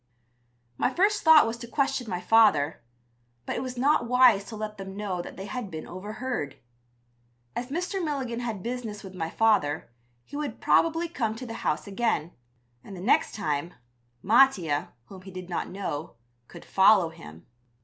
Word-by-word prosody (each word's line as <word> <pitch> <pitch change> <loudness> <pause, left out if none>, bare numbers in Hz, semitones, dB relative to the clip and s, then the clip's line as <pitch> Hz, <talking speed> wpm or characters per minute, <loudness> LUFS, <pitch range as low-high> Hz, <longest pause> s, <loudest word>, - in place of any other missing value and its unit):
My - - +2
first 410 +5 +2
thought 320 -3 +8
was 225 +1 -3
to 235 - -9
question 255 -2 -1
my 180 -2 -2
father, 180 -10 +4 0.6
but - - -3
it - - -2
was 255 -1 -5
not 275 0 +2
wise 250 -5 +5
to 225 - -8
let 215 0 -5
them 195 0 -7
know 195 -4 -2
that - - -10
they 190 - -6
had 230 0 -5
been 160 -2 -7
overheard. 205 - -5 1.0
As 245 - -3
Mr. 360 +5 -2
Milligan 265 -6 -2
had 225 -6 -4
business 235 -4 -5
with 190 -1 -9
my 165 -3 -3
father 165 - +1 0.3
he - - -11
would 295 -1 -4
probably 330 +1 +2
come 225 -9 -2
to 255 +3 -7
the 230 - -6
house - - -1
again, 200 -6 -1 0.5
and 195 - -10
the - - -8
next 200 +8 +2
time, 165 -4 -2 0.5
Mattia, 185 - +3
whom 190 -2 -12
he 190 - -11
did 185 -1 -8
not - - -2
know, 170 -7 -5 0.3
could - - -12
follow 190 -3 +5
him. 80 - -13
215 Hz, 170 wpm, -27 LUFS, 185-250 Hz, 1.0 s, thought